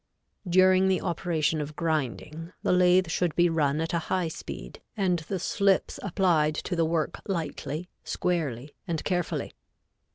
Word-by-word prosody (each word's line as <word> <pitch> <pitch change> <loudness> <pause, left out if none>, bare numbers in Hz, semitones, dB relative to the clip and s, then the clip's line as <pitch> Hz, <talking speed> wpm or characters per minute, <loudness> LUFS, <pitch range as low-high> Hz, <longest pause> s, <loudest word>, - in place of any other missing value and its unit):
During 185 +1 +5
the 190 -1 +2
operation 165 -3 0
of 150 +1 -6
grinding, 155 - -2
the - - +2
lathe 180 0 +5
should 170 0 0
be 175 0 +4
run 150 -3 +1
at 165 +2 -2
a 170 - +2
high 175 +1 -1
speed - - -8 0.2
and 185 -4 +2
the 175 +5 -4
slips 195 +2 +1
applied 165 -5 +2
to 180 - -3
the 165 -1 +2
work 160 -1 -1
lightly, 165 -2 -3 0.2
squarely 150 -7 -2
and 165 -3 -2
carefully. 175 -2 -2
170 Hz, 150 wpm, -27 LUFS, 155-180 Hz, 0.2 s, During